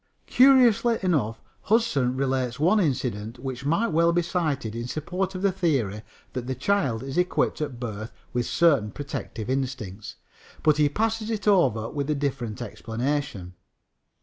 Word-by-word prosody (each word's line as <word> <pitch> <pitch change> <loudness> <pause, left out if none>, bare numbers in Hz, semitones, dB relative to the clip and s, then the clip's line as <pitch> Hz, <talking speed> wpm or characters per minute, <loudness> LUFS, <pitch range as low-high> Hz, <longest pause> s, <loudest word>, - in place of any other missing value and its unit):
Curiously 245 -3 +5
enough, 130 - 0 0.2
Hudson 155 - +1
relates 130 -2 -1
one 180 +8 +4
incident 125 - -1
which 130 +1 -5
might 185 +10 +2
well 170 +1 +3
be 175 0 +1
cited 155 -10 -1
in 120 +1 -4
support 180 +7 -3
of 185 - -4
the 200 - +4
theory 135 - 0 0.3
that 125 -1 -4
the 130 - -2
child 130 - 0
is 135 +5 -2
equipped 180 -2 0
at 140 -5 -4
birth 110 -2 -5 0.2
with 120 -1 0
certain 145 -11 +3
protective 130 -5 -6
instincts, 125 -7 -4 0.5
but 155 -1 +4
he 150 -1 +4
passes 220 +5 -1
it 215 -2 -3
over 140 - +3
with 145 -1 -3
a 150 - +2
different 130 -6 -3
explanation. 115 -2 -3
140 Hz, 150 wpm, -25 LUFS, 120-180 Hz, 0.5 s, Curiously